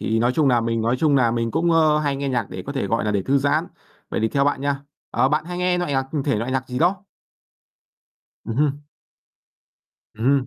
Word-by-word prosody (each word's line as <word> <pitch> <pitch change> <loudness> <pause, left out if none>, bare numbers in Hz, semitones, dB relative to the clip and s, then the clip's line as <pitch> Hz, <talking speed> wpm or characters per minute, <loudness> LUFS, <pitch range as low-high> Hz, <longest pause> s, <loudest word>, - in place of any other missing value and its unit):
Thì 110 - 0
nói 120 +2 +2
chung 145 0 +2
nà 120 -2 +3
mình 115 0 -1
nói 120 +3 +1
chung 150 -3 +3
nà 120 -4 +4
mình 115 0 -1
cũng, 170 +8 +1
ơ, 155 -2 +4
hay 145 -2 -1
nghe 140 0 -2
nhạc 120 -5 -1
để 95 0 -6
có 140 - -4
thể, 135 - -2
gọi 115 +2 0
nà, 105 - 0
để 100 -2 0
thư 140 +5 +2
giãn. 140 +1 +1 0.4
Vậy - - -1
thì 110 - +1
theo 140 +3 +1
bạn 145 -2 0
nha, 140 -1 -1 0.3
ờ, 130 - +2
bạn 150 +2 0
hay 175 +1 -5
nghe 180 0 +1
loại 175 -5 -2
nhạc 135 -1 +1 0.2
thể 140 -6 +1
loại 115 +4 -2
nhạc 130 0 -2
gì 125 - -3
đó? 185 +4 +1 1.4
Ừm 115 +1 -4
hưm. 145 -1 +1 1.4
Ừm 110 +2 -5
hưm. 135 -1 +3
135 Hz, 240 wpm, -22 LUFS, 115-150 Hz, 1.4 s, nà